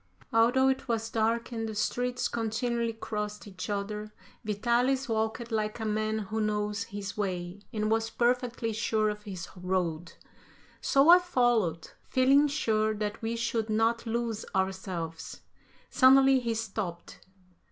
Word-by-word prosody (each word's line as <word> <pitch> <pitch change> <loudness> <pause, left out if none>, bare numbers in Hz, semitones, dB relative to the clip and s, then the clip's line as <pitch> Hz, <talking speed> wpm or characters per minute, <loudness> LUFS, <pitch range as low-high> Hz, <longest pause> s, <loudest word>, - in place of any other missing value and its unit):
Although 245 +4 +4
it 265 0 -1
was 225 -1 -1
dark 230 +2 0
and 225 -1 -3
the 215 - -6
streets 245 +3 -1
continually 230 +1 -1
crossed 210 -1 -5
each 195 +1 -7
other, 210 +1 -3 0.3
Vitalis 240 +5 +1
walked 225 +1 -2
like 215 0 -1
a 220 - -3
man 215 0 0
who 220 +1 -3
knows 210 +1 -1
his 200 -3 -6
way, 185 -2 -3
and 215 -2 -1
was 225 0 +1
perfectly 240 -1 0
sure 215 0 +1
of 210 0 -5
his 190 -5 -7
road. 180 -3 -2 0.7
So 275 +3 +4
I 355 +1 +10
followed, 240 - +1 0.2
feeling 275 +3 +5
sure 220 -7 +1
that 210 0 -3
we 225 +1 -2
should 230 -1 -1
not 225 +2 +1
lose 225 -1 -2
ourselves. 185 -4 -3 0.5
Suddenly, 270 0 +6
he 235 -2 -2
stopped. 200 -6 -5
220 Hz, 140 wpm, -29 LUFS, 210-235 Hz, 0.7 s, I